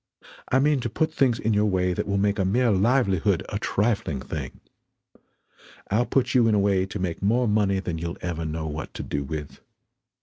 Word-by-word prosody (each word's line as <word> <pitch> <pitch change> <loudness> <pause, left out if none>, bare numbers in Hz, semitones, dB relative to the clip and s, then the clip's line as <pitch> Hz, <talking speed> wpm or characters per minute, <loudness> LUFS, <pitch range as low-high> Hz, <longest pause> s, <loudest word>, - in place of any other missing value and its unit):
I 130 - +4
mean 145 +1 +3
to 120 - -3
put 155 +8 -1
things 125 -4 +2
in 110 -1 0
your 105 +1 +2
way 90 -2 +1
than - - -3
will 100 0 0
make 100 0 +1
a - - +3
mere 115 +5 +2
livelihood 100 -2 +2
a - - -3
trifling 100 - 0
thing. - - -6 1.3
I'll 115 +4 +2
put 130 -1 +1
you 120 -3 +4
in 110 - +3
a - - +3
way 100 -1 +2
to 100 - -5
make 90 -4 -3
more 120 +5 +2
money 105 -2 +2
that 85 -4 -4
you'll 85 +1 -4
ever 85 -2 -4
know 80 0 -3
what 75 0 -6
to - - -5
do 70 -1 -3
with. 75 +1 -6
100 Hz, 205 wpm, -25 LUFS, 90-115 Hz, 1.3 s, I